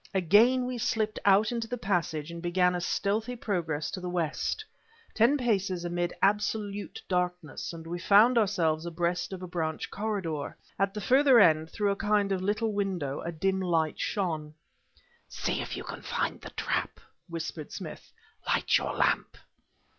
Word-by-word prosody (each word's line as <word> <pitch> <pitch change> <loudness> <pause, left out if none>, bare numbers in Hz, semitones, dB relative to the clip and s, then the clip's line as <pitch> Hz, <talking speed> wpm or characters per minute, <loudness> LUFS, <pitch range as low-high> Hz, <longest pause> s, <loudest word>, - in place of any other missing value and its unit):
Again 220 +8 +5
we 250 -1 -3
slipped 215 -1 0
out 205 +3 +5
into 230 -1 -2
the 245 +2 -3
passage 170 -7 -1
and 170 0 -7
began 180 +1 +2
a 180 - -2
stealthy 215 +7 -1
progress 170 -9 -2
to 190 - -4
the 180 - -4
west. 175 - -2 0.5
Ten 240 +6 +4
paces 195 -8 0
amid 175 0 -1
absolute 205 - 0
darkness, 180 -4 -2
and 165 -1 -9
we 175 +2 -4
found 210 +7 +6
ourselves 170 -7 +1
abreast 175 +2 -1
of 185 -1 -6
a - - -5
branch 160 -3 -3
corridor. 190 -8 -3 0.2
At 195 +1 +1
the 210 - -3
further 265 +1 +6
end, 160 -5 +5
through 205 +1 0
a - - 0
kind 205 -1 +1
of 190 -1 0
little 210 +3 0
window, 180 -9 -2
a 170 - -4
dim 190 +4 0
light 165 -4 0
shone. 160 -7 -2 0.7
"See - - -2
if - - -5
you - - -5
can - - -7
find - - -2
the - - -8
trap," - - -2 0.3
whispered 165 -2 -5
Smith; - - -8 0.4
"light - - +2
your - - -3
lamp." - - +1
190 Hz, 165 wpm, -29 LUFS, 170-210 Hz, 0.7 s, found